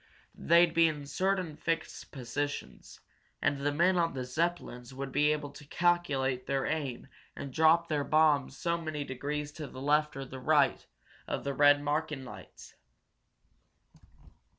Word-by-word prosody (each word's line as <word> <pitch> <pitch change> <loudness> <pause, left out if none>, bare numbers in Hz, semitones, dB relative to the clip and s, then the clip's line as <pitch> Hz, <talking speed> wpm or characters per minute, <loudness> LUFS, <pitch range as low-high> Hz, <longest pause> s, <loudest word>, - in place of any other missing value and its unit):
They'd 170 0 +4
be 165 0 +5
in 150 -2 -4
certain 185 +1 -1
fixed 165 +1 -3
positions, 145 +2 -5 0.4
and 145 - 0
the 145 +1 0
men 175 +5 +3
on 165 -4 0
the 130 -1 -3
Zeppelins 130 -4 -3
would 135 0 -5
be 150 +2 +3
able 145 -2 -3
to 145 0 -14
calculate 145 -8 0
their 135 -1 0
aim, 140 -6 -3 0.3
and 135 -2 -7
drop 160 +3 +4
their 150 -3 0
bombs 150 -3 +2
so 170 -1 -1
many 155 -3 -4
degrees 145 +3 -4
to 150 -1 -7
the 130 - -10
left 150 +1 +1
or 135 - -5
right 145 +1 +2 0.4
of - - -3
the 140 - -2
red 145 0 +5
marking 150 -2 -2
lights." 125 - -12
145 Hz, 150 wpm, -30 LUFS, 140-160 Hz, 0.4 s, be